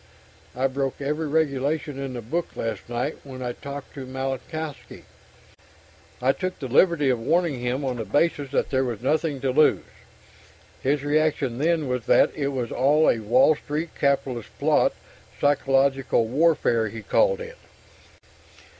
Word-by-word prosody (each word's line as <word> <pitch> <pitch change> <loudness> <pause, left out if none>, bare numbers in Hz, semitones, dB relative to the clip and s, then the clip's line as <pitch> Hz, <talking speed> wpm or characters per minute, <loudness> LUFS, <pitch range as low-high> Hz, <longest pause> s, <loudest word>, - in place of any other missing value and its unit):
I 130 +2 0
broke 135 0 -1
every 150 +3 -2
regulation 145 -1 -1
in 135 -1 -4
the 120 -2 -6
book 165 +10 -3
last 115 -1 -4
night 120 +5 -2
when 130 -2 -8
I 125 - -2
talked 140 +2 -8
to 135 -2 -8
Malinowski. 135 +4 -5 1.2
I 130 +2 +3
took 185 +5 -4
the 135 - -5
liberty 145 +1 +3
of 125 - -1
warning 165 +2 +1
him, 125 +3 -2
on 130 -2 -2
the 115 - -3
basis 145 - +1
that 140 - -1
there 130 0 +2
was 120 -4 -4
nothing 150 0 0
to 135 - 0
lose. 150 +4 +4 1.0
His 140 +1 0
reaction 145 -4 0
then 160 -1 +1
was 125 -2 -3
that - - +5
it 140 -2 -1
was 130 -4 -3
all 150 +4 +3
a 115 - -2
Wall 120 +8 +4
Street 150 +3 -4
capitalist 135 -5 -1
plot - - +2 0.4
'psychological 135 -3 +2
warfare,' 130 -5 +2
he 110 +1 -8
called - - +2
it. 485 +1 -9
140 Hz, 155 wpm, -24 LUFS, 125-155 Hz, 1.2 s, that